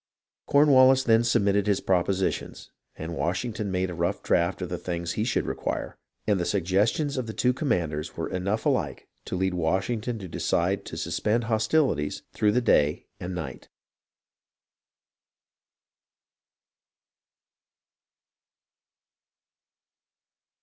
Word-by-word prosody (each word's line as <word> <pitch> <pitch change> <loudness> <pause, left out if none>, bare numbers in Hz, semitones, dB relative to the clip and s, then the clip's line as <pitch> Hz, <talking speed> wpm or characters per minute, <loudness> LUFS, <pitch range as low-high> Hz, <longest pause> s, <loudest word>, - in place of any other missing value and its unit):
Cornwallis 135 -2 +6
then 115 -1 +4
submitted 100 -3 +2
his 100 -2 +2
propositions, 95 +1 -1 0.2
and 80 +2 -6
Wash 90 +5 -1
ington 110 -3 -4
made 95 -1 -1
a - - -5
rough 85 0 -2
draft 85 +1 +1
of 90 - -4
the 90 - -4
things 85 -1 -3
he 105 - -1
should 120 - 0
require, - - -3 0.3
and 105 -3 +2
the - - 0
suggestions 100 - +1
of 125 -3 -2
the 110 - -5
two 125 0 +2
commanders 85 - -2
were - - -2
enough 100 +4 -2
alike - - -1 0.2
to - - -4
lead 95 0 0
Washington 100 +8 -1
to 95 -3 -7
decide 90 +3 0
to 80 - -7
suspend 105 +8 0
hostilities 110 - +1
through 105 -1 +2
the 125 - +2
day 75 -10 +2
and 90 +1 -5
night. 75 -8 -7
95 Hz, 120 wpm, -26 LUFS, 90-115 Hz, 0.3 s, Cornwallis